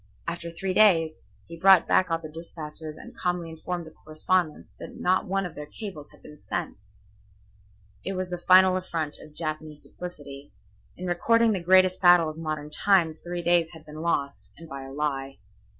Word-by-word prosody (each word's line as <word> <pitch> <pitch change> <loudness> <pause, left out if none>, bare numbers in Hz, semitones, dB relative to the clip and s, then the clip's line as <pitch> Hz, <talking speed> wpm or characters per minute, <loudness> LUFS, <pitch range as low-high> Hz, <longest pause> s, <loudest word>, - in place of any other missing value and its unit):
After 170 0 -4
three 185 +3 -3
days 165 -7 +4 0.2
he 170 0 -11
brought 190 -2 +6
back 185 - +3
all 165 - +1
the 165 -1 -9
despatches 155 -1 -8
and - - -12
calmly 175 -2 -2
informed 175 +2 -5
the 160 - -12
correspondents 155 +1 -2
that - - -9
not 185 +1 +1
one 195 +1 0
of 175 - -6
their 150 0 -8
cables 170 -5 -8
had - - -21
been 150 -1 -14
sent. 175 - -3 1.2
It 195 - -3
was 185 -1 -4
the 180 - -3
final 185 +1 +6
affront 165 -5 -4
of 155 -1 -14
Japanese 155 -2 -5
duplicity. 145 -5 -10 0.4
In 180 - -6
recording 230 +6 +3
the 195 - 0
greatest 185 +1 +4
battle 175 -3 +6
of 155 - -13
modern 155 -2 -4
times 170 -3 +2
three 175 0 -5
days 170 -1 +3
had 160 -1 -13
been 155 +1 -9
lost, 140 -4 -2
and 165 - -12
by 140 -3 -7
a 135 - -9
lie. 135 -2 -3
165 Hz, 180 wpm, -26 LUFS, 155-180 Hz, 1.2 s, brought